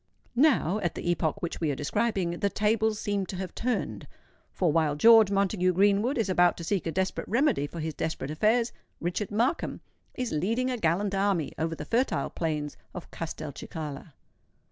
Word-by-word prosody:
Now—at 215 - +2
the 175 - -1
epoch 175 +3 -1
which 170 - -4
we 160 - +1
are 140 - 0
describing—the 195 - 0
tables 215 +1 +1
seem 200 -2 -1
to 190 - -5
have 185 -1 -5
turned; 250 +1 -2 0.4
for 175 -4 +1
while 155 -2 +2
George 225 +4 +7
Montague 195 -2 +1
Greenwood 205 - +3
is 225 - +1
about 175 -2 +3
to 170 - -6
seek 185 0 -1
a - - -1
desperate 190 +2 -2
remedy 240 - +2
for 170 - -8
his 160 0 -3
desperate 150 -2 -3
affairs, 225 +9 +2 0.3
Richard 180 +4 -2
Markham 235 +10 0 0.4
is 250 -2 -3
leading 230 +11 0
a 250 - -2
gallant 190 +3 +1
army 195 -5 0
over 165 +1 -1
the 150 - -7
fertile 245 - 0
plains 150 -3 -3 0.2
of 180 - -8
Castelcicala. 155 -1 -6
190 Hz, 165 wpm, -28 LUFS, 165-215 Hz, 0.4 s, George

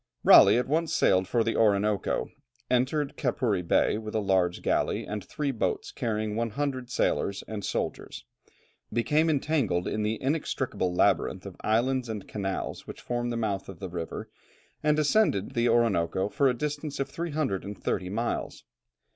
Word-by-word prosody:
Raleigh 100 +3 +8
at 125 - 0
once 160 +3 0
sailed 95 0 +3
for 115 +3 +2
the 115 - -1
Orinoco, 105 -2 +1 0.4
entered 135 +3 +1
Capuri 120 -7 0
Bay 90 +4 +2
with 110 -1 -7
a - - +2
large 95 -3 +1
galley - - 0
and 105 -2 -5
three 145 +7 -2
boats 115 - -2
carrying 110 -2 -2
100 125 +3 -2
sailors 100 -4 0
and 105 -2 -5
soldiers, 105 - -4 0.7
became 150 +8 +2
entangled 135 - 0
in 110 - -1
the 105 +1 -1
inextricable 135 - -1
labyrinth 90 +1 +1
of 95 -3 -8
islands 120 +3 +1
and 105 -3 -5
canals 95 -2 -4
which - - -8
form 120 0 -2
the 120 - -2
mouth 100 -4 -2
of 95 - -8
the 95 +2 -6
river, 85 -2 -5 0.5
and 150 0 +2
ascended 150 - +2
the 120 0 +1
Orinoco 100 -5 +2
for 140 +5 +2
a 125 - 0
distance 150 +1 -3
of 140 - 0
330 100 - -3
miles. 115 +4 -3
115 Hz, 155 wpm, -28 LUFS, 100-135 Hz, 0.7 s, Raleigh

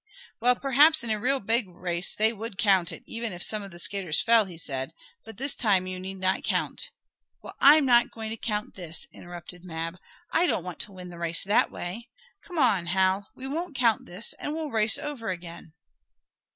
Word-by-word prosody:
"Well, 245 +2 +4
perhaps 280 +3 +4
in 230 - -2
a 215 - 0
real 270 +5 +1
big 225 0 +1
race 175 0 -2
they 220 +2 +2
would 220 -2 -7
count 195 -6 +3
it, - - -9
even 230 -1 -4
if 175 0 -3
some 215 -1 +1
of 200 - -8
the 170 - -12
skaters 180 -3 +2
fell," 230 -2 +5
he 180 -3 -11
said. 135 -4 -3 0.3
"But 225 -3 -12
this 275 +4 +2
time 195 -5 +2
you 185 0 -5
need 190 +1 -6
not 190 0 0
count - - -1 0.3
" - - -53
"Well, - - -9
I'm 295 +1 +7
not 240 -2 +4
going 220 -1 -7
to - - -3
count 210 -1 -3
this!" 170 -3 -2
interrupted 175 0 -10
Mab. 165 0 -5 0.3
"I 350 +2 +3
don't 180 - 0
want 180 -2 -7
to 205 - -3
win 180 -2 -10
the 170 - -11
race 170 0 +3
that 205 +2 +3
way. 225 +8 -7 0.3
Come 355 - -9
on, 200 - +3
Hal. 190 +2 +1
We 260 - -8
won't 315 +3 -4
count 235 -4 +2
this, 185 +6 0
and 295 - -4
we'll 315 -3 -4
race 220 -1 +4
over 280 -8 -5
again!" 170 -3 -7
205 Hz, 210 wpm, -26 LUFS, 180-235 Hz, 0.3 s, I'm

